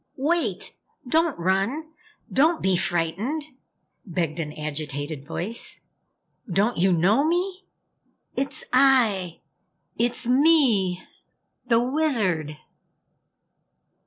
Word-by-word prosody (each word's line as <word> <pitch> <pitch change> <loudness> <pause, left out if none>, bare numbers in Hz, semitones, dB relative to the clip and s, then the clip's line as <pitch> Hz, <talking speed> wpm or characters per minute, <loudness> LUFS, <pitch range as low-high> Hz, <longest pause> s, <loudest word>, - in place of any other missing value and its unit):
"Wait! 325 +5 -1 0.3
Don't 320 +3 +2
run! 195 - -1 0.4
Don't 320 +5 +3
be 190 -1 +2
frightened!" 180 - -1 0.6
begged 170 -4 -3
an 150 -2 -3
agitated 150 -1 -5
voice. 180 +9 -2 0.7
"Don't 200 +4 +1
you 190 +2 +3
know 190 - +3
me? 365 +4 -1 0.7
It's 275 +1 -2
I! 235 -10 +3 0.6
It's 235 +1 0
me! 245 - +3 0.6
THE 230 -1 +4
WIZARD!" 230 - 0
210 Hz, 85 wpm, -24 LUFS, 170-280 Hz, 0.7 s, THE